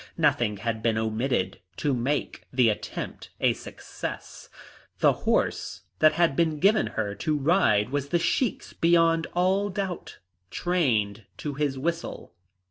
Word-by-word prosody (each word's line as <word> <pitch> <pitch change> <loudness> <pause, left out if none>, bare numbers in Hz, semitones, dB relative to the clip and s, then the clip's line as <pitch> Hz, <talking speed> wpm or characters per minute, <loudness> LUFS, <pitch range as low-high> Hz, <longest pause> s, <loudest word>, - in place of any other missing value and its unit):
Nothing 105 -4 +2
had 110 +2 -3
been 110 -1 +1
omitted 110 0 -1 0.2
to 145 -2 0
make 130 +4 -2
the 125 -3 +4
attempt 105 - -5
a - - +3
success. - - -8 0.5
The - - +4 0.2
horse - - 0 0.2
that 155 0 +6
had 165 -3 +2
been 160 -1 +1
given 205 +8 +3
her 105 -2 -1
to 150 +9 -1
ride 145 - +3
was 140 0 -2
the 175 - +3
Sheik's 215 +6 -1
beyond 165 -1 +3
all 190 +3 +2
doubt, 190 -2 -4 0.3
trained 115 - 0
to 150 - -4
his 140 -1 -1
whistle. 170 +5 -4
145 Hz, 135 wpm, -26 LUFS, 115-170 Hz, 0.5 s, that